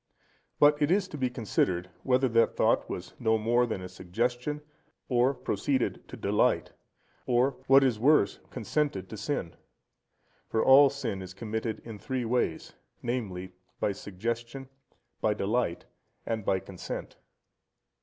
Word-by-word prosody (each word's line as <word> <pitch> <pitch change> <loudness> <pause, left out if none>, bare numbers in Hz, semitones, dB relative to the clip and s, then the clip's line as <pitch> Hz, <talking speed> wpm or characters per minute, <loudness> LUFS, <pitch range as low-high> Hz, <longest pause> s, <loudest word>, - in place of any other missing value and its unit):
But 145 0 +5
it 145 - +3
is 190 +1 +2
to 150 - -6
be 130 -1 +1
considered, 90 -6 -1
whether 130 0 +3
that 115 0 +3
thought - - +2
was - - -6
no 110 0 +3
more 120 +3 +2
than 95 -5 -4
a - - -5
suggestion, 120 +11 -2 0.5
or 125 +1 +4
proceeded 125 +4 -1
to - - -9
delight, - - +1 0.6
or, 125 +2 +3 0.2
what 135 +1 +7
is 125 -5 +2
worse, 125 -6 +4
consented 125 -5 -1
to - - -6
sin. 105 - -3 0.9
For 110 - +1
all 135 +1 +8
sin 110 -9 -4
is 95 0 -9
committed 110 +1 -3
in 110 -3 -8
three 130 -1 -2
ways, 115 -8 -1 0.3
viz., 100 -7 -3 0.3
by - - +1
suggestion, 115 +7 -5 0.5
by 105 -1 +2
delight, 100 -4 -1 0.4
and 110 -2 -2
by 95 -1 +1
consent. 95 -3 -7
115 Hz, 140 wpm, -29 LUFS, 100-130 Hz, 0.9 s, all